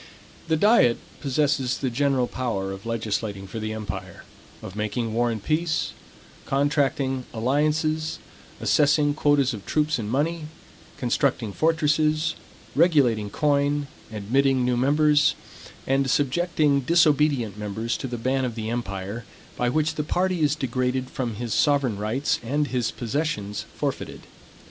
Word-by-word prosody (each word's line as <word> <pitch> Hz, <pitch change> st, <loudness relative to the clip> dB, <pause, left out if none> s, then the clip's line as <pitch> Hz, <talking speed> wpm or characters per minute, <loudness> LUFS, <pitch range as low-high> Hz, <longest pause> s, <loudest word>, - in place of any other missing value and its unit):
The 160 Hz, -1 st, +2 dB
diet 205 Hz, -, +5 dB, 0.2 s
possesses 140 Hz, -2 st, +1 dB
the 130 Hz, -3 st, -2 dB
general 135 Hz, 0 st, +2 dB
power 115 Hz, -7 st, -3 dB
of 95 Hz, +3 st, -8 dB
legislating 110 Hz, -3 st, -2 dB
for 110 Hz, +4 st, -6 dB
the 110 Hz, 0 st, -3 dB
empire; 110 Hz, -1 st, -6 dB, 0.4 s
of 95 Hz, -, -8 dB
making 110 Hz, +2 st, -2 dB
war 120 Hz, +1 st, +2 dB
and 110 Hz, -3 st, -4 dB
peace; 160 Hz, +1 st, 0 dB, 0.6 s
contracting 135 Hz, -2 st, +1 dB
alliances; 155 Hz, +6 st, 0 dB, 0.4 s
assessing 145 Hz, 0 st, +3 dB
quotas 145 Hz, -3 st, +2 dB
of 105 Hz, -3 st, -7 dB
troops 155 Hz, -2 st, +1 dB
and 105 Hz, -2 st, -4 dB
money; 155 Hz, +6 st, 0 dB, 0.5 s
constructing 120 Hz, -3 st, 0 dB
fortresses; 155 Hz, -, +2 dB, 0.4 s
regulating 125 Hz, -, +3 dB
coin; 145 Hz, +2 st, +1 dB, 0.3 s
admitting 130 Hz, +5 st, +1 dB
new 125 Hz, 0 st, +2 dB
members; 150 Hz, +4 st, +3 dB, 0.5 s
and 135 Hz, 0 st, +1 dB
subjecting 145 Hz, +1 st, +2 dB
disobedient 150 Hz, -, +3 dB
members 110 Hz, +3 st, -2 dB
to 135 Hz, -, -5 dB
the 120 Hz, -1 st, -4 dB
ban 130 Hz, +3 st, 0 dB
of 120 Hz, -3 st, -2 dB
the 110 Hz, -1 st, -3 dB
empire, 100 Hz, -1 st, -4 dB, 0.3 s
by 125 Hz, -, 0 dB
which 155 Hz, +4 st, +1 dB
the 150 Hz, -, -2 dB
party 180 Hz, +3 st, 0 dB
is 150 Hz, -1 st, +3 dB
degraded 130 Hz, -2 st, -1 dB
from 120 Hz, -4 st, -3 dB
his 115 Hz, +1 st, -3 dB
sovereign 140 Hz, -8 st, +2 dB
rights 115 Hz, +7 st, 0 dB
and 145 Hz, +4 st, -1 dB
his 125 Hz, -2 st, 0 dB
possessions 115 Hz, -5 st, -3 dB
forfeited. -, -, -3 dB
135 Hz, 135 wpm, -25 LUFS, 115-150 Hz, 0.6 s, diet